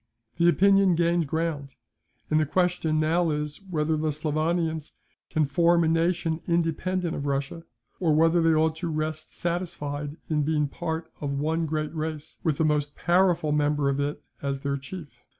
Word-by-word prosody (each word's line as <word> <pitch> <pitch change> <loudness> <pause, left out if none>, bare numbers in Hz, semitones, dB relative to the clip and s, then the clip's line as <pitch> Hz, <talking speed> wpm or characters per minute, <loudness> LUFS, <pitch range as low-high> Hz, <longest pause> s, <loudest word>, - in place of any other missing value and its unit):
"The 170 +1 +5
opinion 195 0 +4
gained 170 -1 +2
ground; 150 -3 -2 0.6
and 155 - +4
the 155 - +2
question 175 -2 +1
now 165 +2 +2
is, 150 +2 -3
whether 155 -2 0
the 155 0 0
Slavonians 155 +1 -1 0.4
can 155 -1 +2
form 170 +4 +3
a - - +2
nation 165 0 +1
independent 170 +1 0
of 140 - -4
Russia; 140 +4 -2 0.3
or 160 -4 +2
whether 165 +2 +4
they 165 -1 +4
ought 160 0 +2
to 170 - -3
rest 155 0 -3
satisfied 150 -4 -3
in 155 -2 +1
being 150 0 +1
part 160 +2 -4
of 140 -1 -2
one 160 +3 0
great 155 0 -2
race, 155 -2 -5
with 155 -4 +1
the 160 - +2
most 150 -1 0
powerful 175 -3 +2
member 145 -1 +2
of 140 0 -1
it 145 +1 -1 0.2
as 140 -1 -2
their 140 -1 -1
chief. 140 -4 -10
160 Hz, 170 wpm, -26 LUFS, 150-170 Hz, 0.6 s, The